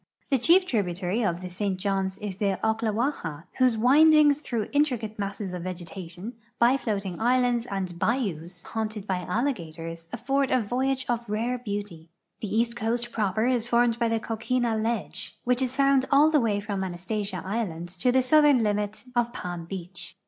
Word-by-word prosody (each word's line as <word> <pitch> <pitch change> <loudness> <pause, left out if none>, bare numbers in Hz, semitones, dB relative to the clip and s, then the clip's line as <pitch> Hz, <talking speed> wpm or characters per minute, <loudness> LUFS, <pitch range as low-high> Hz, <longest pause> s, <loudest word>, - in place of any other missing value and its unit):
The 270 - +3
chief 355 +9 +5
tribu 200 - -1
taiy 190 +6 -1
of 170 +1 -5
the 185 - -5
St. 190 +1 -2
Johns 195 -1 -1
is 200 -3 -6
the 195 -2 0
Oklawaha, 220 - -1 0.2
whose 255 -3 +4
windings 295 +4 +6
through 230 -7 -2
intricate 250 -8 0
masses 200 -1 -4
of 180 - -4
vegetation, 180 +3 -6 0.2
by 240 +3 +5
floating 200 -8 -3
islands 245 0 +2
and 185 -3 -4
bayous 180 - -2
haunted 215 -2 -4
by 190 -3 -1
alligators, 165 - -3
afford 270 +3 0
a 255 - +3
vo^^^age 255 +4 -1
of 235 -2 -2
rare 235 +4 -1
beauty. 200 -7 -6 0.3
The 210 - -4
east 230 +1 +1
coast 235 +1 -2
proper 215 0 0
is 245 -2 +1
formed 235 -1 +2
Ijy 235 -1 +2
the 225 0 +1
coquina 230 +1 -1
ledge, 220 -2 -3
which 250 +1 +1
is 255 0 -1
found 275 -1 +4
all 295 +3 +6
the 300 -3 +4
way 210 -3 +1
from 200 -2 -3
Anastasia 190 +3 -3
island 185 -5 -3
to 185 +8 0
the 260 +1 +3
southern 290 -2 +5
limit 210 0 -1
of 240 0 +1
Palm 175 -5 -6
beach. 180 -1 -8
220 Hz, 170 wpm, -26 LUFS, 190-245 Hz, 0.3 s, windings